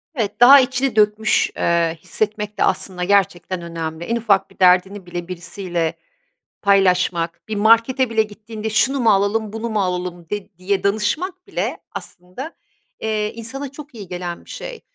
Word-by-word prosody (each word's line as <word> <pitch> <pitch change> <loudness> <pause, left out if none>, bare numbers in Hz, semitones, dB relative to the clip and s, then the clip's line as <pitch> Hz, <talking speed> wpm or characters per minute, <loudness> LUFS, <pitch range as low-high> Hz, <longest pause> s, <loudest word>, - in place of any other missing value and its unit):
Evet, 220 -4 -2
daha 270 +3 +10
içini 260 -2 0
dökmüş, 215 +1 +3
eee, 170 -1 +1
hissetmek 210 -1 -2
de - - +4
aslında 180 -1 -1
gerçekten 185 -2 +1
önemli. 165 -1 -5
En 230 - -1
ufak 210 -4 +2
bir - - -23
derdini 185 +1 +4
bile 175 0 -6
birisiyle 175 -1 -3 0.7
paylaşmak, 180 -3 +2
bir 215 - -3
markete 230 +4 +4
bile 220 -1 +3
gittiğinde 215 +1 -7
şunu 265 +5 +2
mu 230 -3 +4
alalım 205 +2 +1
bunu 225 +1 -4
mu 215 -2 +1
alalım 180 -2 -3
de 205 -3 -5
diye 195 +1 -1
danışmak 315 - -1
bile - - -3
aslında, 185 - -9 0.4
eee, 215 -1 -1
insana 260 +4 -6
çok 295 -1 -11
iyi 205 -5 -9
gelen 175 -1 -5
bir - - -16
şey. - - -7
205 Hz, 155 wpm, -20 LUFS, 180-225 Hz, 0.7 s, daha